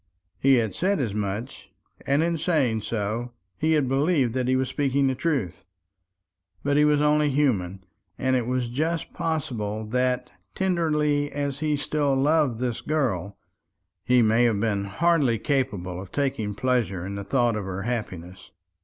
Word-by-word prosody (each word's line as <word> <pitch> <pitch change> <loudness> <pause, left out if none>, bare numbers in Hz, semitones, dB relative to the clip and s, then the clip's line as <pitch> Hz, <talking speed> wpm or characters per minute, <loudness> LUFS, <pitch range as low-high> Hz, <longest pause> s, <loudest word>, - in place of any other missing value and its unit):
He 135 0 +5
had 110 -4 0
said 195 +5 0
as 115 -7 -1
much; 105 +1 -4 0.4
and 140 +3 +3
in 170 -1 0
saying 140 -10 +1
so, 115 +3 -3 0.3
he 160 +1 +2
had 150 -4 +2
believed 135 -2 +2
that 130 -1 -1
he 130 - +3
was 130 0 +1
speaking 140 0 +1
the 135 - +2
truth. 130 - -2 1.0
But 145 0 +1
he 150 +1 +5
was 150 -1 +3
only 150 0 +3
human; 100 -10 0 0.3
and 130 0 +1
it 120 -2 0
is 125 -2 -1
just 160 +6 -2
possible 110 -9 -2
that, 125 +2 0 0.2
tenderly 150 -6 +1
as 140 -1 -3
he 150 -1 0
still 145 -1 0
loved 140 -3 +2
this 125 -2 -2
girl, 105 - -1 0.7
he 125 +1 +4
may 115 +2 +4
have 110 -4 +2
been 100 -2 0
hardly 145 - +2
capable 105 - -2
of 95 - -11
taking 130 -8 -1
pleasure 110 -7 0
in 100 - -5
the 100 0 -5
thought 120 +2 +1
of 105 -2 -3
her 95 +1 -4
happiness. 95 -7 -5
130 Hz, 160 wpm, -25 LUFS, 110-145 Hz, 1.0 s, He